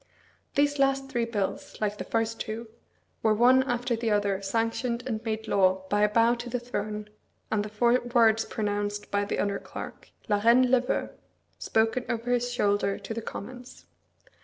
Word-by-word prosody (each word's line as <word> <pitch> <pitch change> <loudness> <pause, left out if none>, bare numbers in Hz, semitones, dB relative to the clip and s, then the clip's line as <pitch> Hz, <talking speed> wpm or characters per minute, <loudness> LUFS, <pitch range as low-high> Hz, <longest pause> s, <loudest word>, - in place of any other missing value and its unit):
These 285 0 +2
last 270 0 +2
three 240 -3 0
bills, 205 -5 -3
like 210 -1 -1
the - - -2
first 225 0 -1
two, 225 +2 -5 0.5
were 220 -1 +3
one 250 +4 +6
after 245 -2 -1
the 230 0 -2
other 205 -2 +1
sanctioned 230 +4 -1
and 225 -3 -3
made 220 -1 -3
law 190 -1 +3
by 205 0 +2
a 210 - +4
bow 230 +2 +4
to 240 0 -5
the 245 +1 -1
throne, 210 -3 -4 0.4
and 210 -2 +1
the 210 - -6
four 240 +4 +3
words 225 -2 +4
pronounced 205 -1 -3
by 205 0 +1
the - - -2
under 200 -1 0
clerk, - - -9 0.2
"la 205 -2 +2
Reine 245 +2 +5
le 260 -2 +5
veut," 250 - -2 0.5
spoken 225 +3 +1
over 235 +1 -2
his 245 0 +1
shoulder 205 -4 +1
to 200 +2 -6
the 230 - -4
Commons. 245 +4 -9
225 Hz, 180 wpm, -27 LUFS, 205-245 Hz, 0.5 s, one